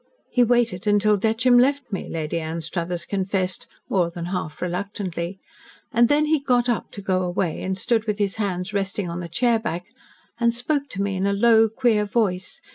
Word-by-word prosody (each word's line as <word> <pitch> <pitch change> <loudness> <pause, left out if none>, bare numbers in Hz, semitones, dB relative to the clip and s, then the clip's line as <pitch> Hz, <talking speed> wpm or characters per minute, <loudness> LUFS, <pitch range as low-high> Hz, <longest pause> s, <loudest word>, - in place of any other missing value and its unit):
"He 250 - +3
waited 235 -5 +2
until 205 0 +4
Detcham 225 +4 +3
left 275 -1 +1
me," 195 - -4
Lady 160 0 -2
Anstruthers 170 +2 -3
confessed, 190 -1 -2 0.2
more 180 -4 +1
than 170 0 -6
half 170 -4 -4
reluctantly. 180 -1 -3 0.5
"And 235 +1 +4
then 295 +3 +3
he 310 0 +2
got 250 -3 +2
up 240 -3 -1
to 200 - -7
go 185 -1 +1
away, 175 -2 -1
and 190 0 -2
stood 225 +3 0
with 210 -1 0
his 205 -1 -1
hands 190 -2 -2
resting 200 -1 -1
on 170 - -4
the 170 -1 -6
chairback, 225 -3 0 0.5
and 235 -1 +2
spoke 280 +3 -1
to 195 -3 -2
me 200 -1 -1
in 190 +1 0
a 200 - +1
low, 225 +1 +5
queer 225 -2 +2
voice. 200 -4 -1
200 Hz, 185 wpm, -23 LUFS, 180-235 Hz, 0.5 s, low